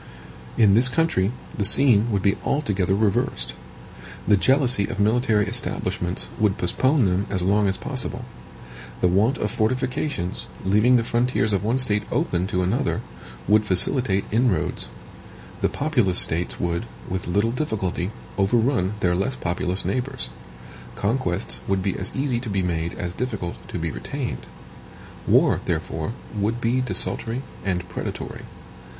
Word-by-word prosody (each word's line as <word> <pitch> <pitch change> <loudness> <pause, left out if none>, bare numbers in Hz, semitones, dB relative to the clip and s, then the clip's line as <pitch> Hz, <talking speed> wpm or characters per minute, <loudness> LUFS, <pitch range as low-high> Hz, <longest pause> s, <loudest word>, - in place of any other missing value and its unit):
In 105 -4 +5
this 120 +4 +4
country 125 - +1 0.2
the 105 - -1
scene 115 0 +4
would 100 -3 0
be 100 - +3
altogether 100 -10 0
reversed. 95 - 0 0.7
The 105 - +6
jealousy 125 -1 +3
of - - -5
military 110 0 +2
establishments 90 +1 +1
would 105 -3 +2
postpone 130 - +2
them 95 +2 0
as 95 -3 -1
long 100 +2 +3
as 95 - 0
possible. - - -4 0.8
The - - +4
want 105 +9 +2
of 105 - -1
fortifications, 125 - -1 0.2
leaving 105 +6 +4
the 120 - +3
frontiers 115 -3 +1
of 100 - 0
one 115 +4 +1
state 105 -5 +2
open 90 +1 0
to 90 -1 0
another, 90 - 0 0.5
would 105 +2 +5
facilitate 100 +1 +4
inroads. 115 -1 +1 0.7
The - - +2
populous 120 - +1
States 85 +2 +2
would, 85 -1 -2 0.2
with 90 -2 -4
little 100 +6 +1
difficulty, 100 - -2 0.3
overrun 110 -1 +2
their 90 -1 +2
less 100 +9 -1
populous 90 0 -2
neighbors. 130 0 -2 0.7
Conquests 100 -4 -1
would 95 -1 0
be 95 -2 -1
as 95 - -3
easy 135 -3 0
to 120 -2 -6
be 100 -2 0
made 85 -1 -2
as 90 0 -4
difficult 105 -7 -4
to - - -5
be 80 -1 -2
retained. 135 - -5 0.8
War, - - +4
therefore, 80 +7 -2 0.2
would 105 +3 -1
be 120 +2 +1
desultory 125 0 -2 0.2
and 90 -2 -2
predatory. 90 - -6
105 Hz, 145 wpm, -23 LUFS, 95-125 Hz, 0.8 s, The